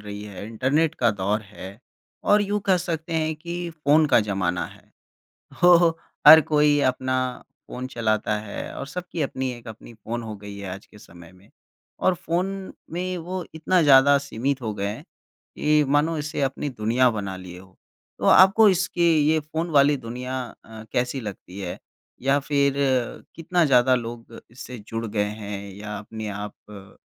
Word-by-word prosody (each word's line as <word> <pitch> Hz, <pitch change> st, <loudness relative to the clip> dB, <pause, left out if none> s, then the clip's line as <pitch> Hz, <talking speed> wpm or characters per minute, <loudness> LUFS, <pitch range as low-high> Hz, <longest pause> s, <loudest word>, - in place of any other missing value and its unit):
रही 105 Hz, 0 st, -8 dB
है, 100 Hz, -1 st, -8 dB
इंटरनेट 135 Hz, +8 st, 0 dB
का 120 Hz, -6 st, +2 dB
दौर 100 Hz, +1 st, -1 dB
है 95 Hz, 0 st, -10 dB, 0.5 s
और 205 Hz, 0 st, +4 dB
यूँ 205 Hz, +1 st, -1 dB
कह 190 Hz, -2 st, +4 dB
सकते 170 Hz, -2 st, -4 dB
हैं 160 Hz, -1 st, 0 dB
कि 175 Hz, +2 st, -5 dB
फ़ोन 155 Hz, -1 st, +3 dB
का 145 Hz, -, +4 dB
ज़माना 95 Hz, -4 st, -1 dB
है, -, -, -16 dB, 0.8 s
तो 175 Hz, -1 st, +7 dB, 0.4 s
हर 160 Hz, -, +12 dB
कोई 150 Hz, -1 st, +4 dB
अपना 130 Hz, 0 st, -1 dB, 0.5 s
फ़ोन 125 Hz, +1 st, -5 dB
चलाता 110 Hz, -3 st, -1 dB
है 105 Hz, -1 st, -7 dB
और 140 Hz, -, -6 dB
सबकी 175 Hz, +2 st, -5 dB
अपनी 130 Hz, -1 st, -2 dB
एक 120 Hz, -1 st, -11 dB
अपनी 110 Hz, +1 st, -11 dB
फ़ोन 115 Hz, +2 st, -5 dB
हो 110 Hz, -1 st, -6 dB
गई 100 Hz, 0 st, -10 dB
है 100 Hz, -1 st, -7 dB
आज 100 Hz, -, -12 dB
के 105 Hz, -, -17 dB
समय 85 Hz, -2 st, -15 dB
में। 95 Hz, +2 st, -21 dB, 0.5 s
और 185 Hz, -, +2 dB
फ़ोन 190 Hz, +2 st, -3 dB, 0.2 s
में 180 Hz, +2 st, -3 dB
वो 180 Hz, +2 st, -5 dB
इतना 175 Hz, +3 st, +2 dB
ज़्यादा 140 Hz, -1 st, +6 dB
सीमित 140 Hz, 0 st, -3 dB
हो 110 Hz, -2 st, -2 dB
गए 100 Hz, -1 st, -3 dB
हैं, 105 Hz, -, -5 dB, 0.5 s
कि 150 Hz, 0 st, +3 dB
मानो 150 Hz, +4 st, +2 dB
इसे 150 Hz, +1 st, -4 dB
अपनी 135 Hz, +2 st, -1 dB
दुनिया 120 Hz, +2 st, +2 dB
बना 100 Hz, -4 st, -4 dB
लिए 90 Hz, -1 st, -10 dB
हो। 95 Hz, 0 st, -17 dB, 0.4 s
तो -, -, -5 dB
आपको 200 Hz, +3 st, +7 dB
इसकी 180 Hz, -2 st, +1 dB, 0.2 s
ये 160 Hz, -, +3 dB
फ़ोन 160 Hz, +3 st, -4 dB
वाली 145 Hz, -1 st, +4 dB
दुनिया 125 Hz, +1 st, -5 dB, 0.2 s
अ, 110 Hz, -1 st, -11 dB
कैसी 125 Hz, +1 st, -1 dB
लगती 100 Hz, -3 st, -8 dB
है? 90 Hz, -2 st, -5 dB, 0.4 s
या 135 Hz, +2 st, +3 dB
फ़िर 140 Hz, -1 st, +1 dB
अ, 130 Hz, -4 st, 0 dB
कितना 170 Hz, +1 st, +1 dB
ज़्यादा 130 Hz, -3 st, +4 dB
लोग 115 Hz, -1 st, -6 dB
इससे 125 Hz, +1 st, -9 dB
जुड़ 115 Hz, 0 st, -3 dB
गए 105 Hz, -1 st, 0 dB
हैं 105 Hz, -1 st, -6 dB
या 105 Hz, +1 st, -7 dB
अपने 110 Hz, +1 st, -7 dB
आप 105 Hz, 0 st, -6 dB, 0.2 s
अ, 100 Hz, -1 st, -12 dB
130 Hz, 175 wpm, -24 LUFS, 105-160 Hz, 0.8 s, हर